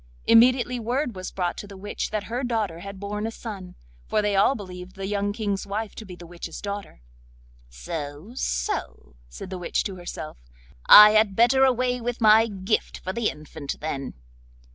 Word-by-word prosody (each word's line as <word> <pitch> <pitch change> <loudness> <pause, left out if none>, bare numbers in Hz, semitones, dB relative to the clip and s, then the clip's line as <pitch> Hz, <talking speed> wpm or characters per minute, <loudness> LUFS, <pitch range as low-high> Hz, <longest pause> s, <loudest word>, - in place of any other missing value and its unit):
Immediately 245 +1 +5
word 245 +1 -2
was 185 0 -5
brought 175 -2 -2
to 205 - -7
the 200 -1 -11
witch 205 +2 -4
that 215 -1 -2
her 240 +5 -4
daughter 220 -9 -1
had 200 +2 -9
borne 210 +2 -3
a - - -4
son—for 180 - -6
they 210 -1 +1
all 200 +8 +4
believed 185 -3 -9
the 195 - -5
young 205 0 -1
King's 205 -2 -3
wife 210 +2 -3
to 220 - -9
be 185 -3 -9
the 175 - -12
witch's 170 -1 -8
daughter. 200 - -7 0.7
'So, 145 - -7
so,' 60 - -3
said 125 - -9
the 185 - -5
witch 175 - -1
to 195 -3 -5
herself; 175 -3 -7 0.5
'I 210 0 +11
had 215 -2 +3
better 245 +4 +4
away 250 -1 +1
with 240 0 -3
my 220 0 +6
gift 200 0 -2
for 185 - -5
the 235 0 0
infant, 150 -1 -7
then. 140 -3 -4
200 Hz, 180 wpm, -25 LUFS, 180-225 Hz, 0.7 s, I